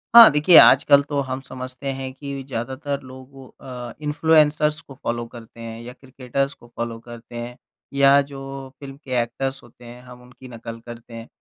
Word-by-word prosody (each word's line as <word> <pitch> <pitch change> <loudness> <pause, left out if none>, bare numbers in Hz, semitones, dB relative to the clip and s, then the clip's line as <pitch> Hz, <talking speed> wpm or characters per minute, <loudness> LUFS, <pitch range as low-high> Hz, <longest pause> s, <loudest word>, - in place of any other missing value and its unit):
हाँ, 235 -1 +12
देखिए 150 +3 +6
आजकल 140 0 +7
तो 145 -1 0
हम 130 0 -4
समझते 130 +1 -8
हैं 130 0 -6
कि 140 0 -7
ज़्यादातर 135 +3 -4
लोगों 130 0 -13 0.4
अ, - - -10
इन्फ्लुएंसर्स 150 0 +2
को 135 - -14
फ़ॉलो 120 -3 -3
करते 115 0 -13
हैं 115 0 -8
या 125 +1 -9
क्रिकेटर्स 135 +1 -4
को 120 - -19
फॉलो 115 -1 -3
करते 120 0 -12
हैं, 120 +1 -6 0.4
या 140 0 +5
जो 135 -1 -8
फ़िल्म 140 -1 -10
के 130 - -11
एक्टर्स 135 +3 -4
होते 120 +1 -17
हैं, 120 +1 -11
हम 125 0 -13
उनकी 125 +1 -15
नकल 115 -1 -8
करते 120 0 -11
हैं। 115 0 -8
130 Hz, 180 wpm, -22 LUFS, 120-140 Hz, 0.4 s, हाँ